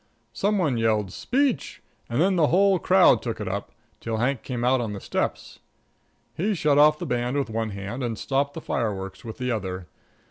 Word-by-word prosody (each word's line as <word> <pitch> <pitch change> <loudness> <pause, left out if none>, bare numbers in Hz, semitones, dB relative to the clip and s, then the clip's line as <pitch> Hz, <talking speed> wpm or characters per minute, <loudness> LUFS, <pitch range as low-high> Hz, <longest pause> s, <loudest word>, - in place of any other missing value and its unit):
Some 205 - +1
one 150 -10 +1
yelled 110 -4 +1
speech, 270 -1 -1 0.3
and 120 +3 -1
then 190 +3 +3
the 160 -4 +4
whole 195 +2 +4
crowd 185 +1 +5
took 115 -3 -4
it 105 - -4
up, 100 +2 -4 0.3
till 115 -1 -3
Hank 125 +2 0
came 125 -2 -4
out 125 +1 +3
on 110 -3 -3
the 100 - -5
steps. - - -3 0.7
He 205 +5 -1
shut 150 -4 +3
off 150 +1 +6
the - - -5
band 125 +2 -1
with 135 -5 -1
one 110 0 -2
hand 100 +5 -6
and 115 -3 -2
stopped 140 +3 -1
the 165 - -5
fireworks 100 -7 -3
with 110 -2 -8
the 125 -1 -2
other. 95 -5 -3
125 Hz, 200 wpm, -25 LUFS, 110-155 Hz, 0.7 s, off